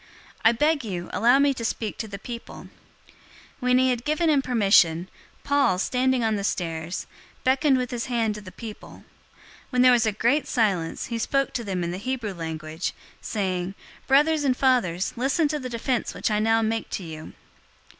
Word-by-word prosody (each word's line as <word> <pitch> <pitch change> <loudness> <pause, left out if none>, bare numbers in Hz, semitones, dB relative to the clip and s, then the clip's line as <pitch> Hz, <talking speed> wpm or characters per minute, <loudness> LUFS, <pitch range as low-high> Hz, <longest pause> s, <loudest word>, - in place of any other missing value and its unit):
I 225 - +7
beg 295 +4 +1
you, 180 -5 -5
allow 240 +3 +4
me 280 0 +3
to 245 - -6
speak 220 -1 -3
to 220 - -3
the 200 -1 -7
people." 235 +3 -9 0.4
021:040 - - -23 0.5
When 250 -1 +3
he 260 0 +4
had 240 -1 -2
given 310 +3 +1
him 285 -2 +3
permission, 195 -9 +3 0.4
Paul, 280 -9 +2
standing 255 +4 +1
on 220 -1 +1
the 200 - -3
stairs, 165 -2 -3 0.4
beckoned 265 +1 +3
with 250 -1 -2
his 240 0 -3
hand 230 -4 0
to 210 - -8
the 185 -2 -11
people. 220 0 -10 0.7
When 250 -1 +3
there 255 - +7
was 235 -2 +3
a - - +2
great 235 +8 +1
silence, 195 -9 0
he 230 - -1
spoke 275 +4 0
to 235 - -2
them 190 -4 -2
in 170 - -2
the 180 - -5
Hebrew 235 -2 -3
language, 160 -1 -4 0.3
saying, 190 -3 -2 0.3
022:001 - - -32
"Brothers 295 +3 +4
and 260 -3 +1
fathers, 200 -9 +1
listen 275 +6 +1
to 300 0 -2
the 255 -2 -5
defense 240 +1 -2
which - - -1
I 210 - +2
now 225 +1 +3
make 225 +1 -1
to 195 - -4
you." 160 -2 -9
230 Hz, 195 wpm, -25 LUFS, 195-260 Hz, 0.7 s, I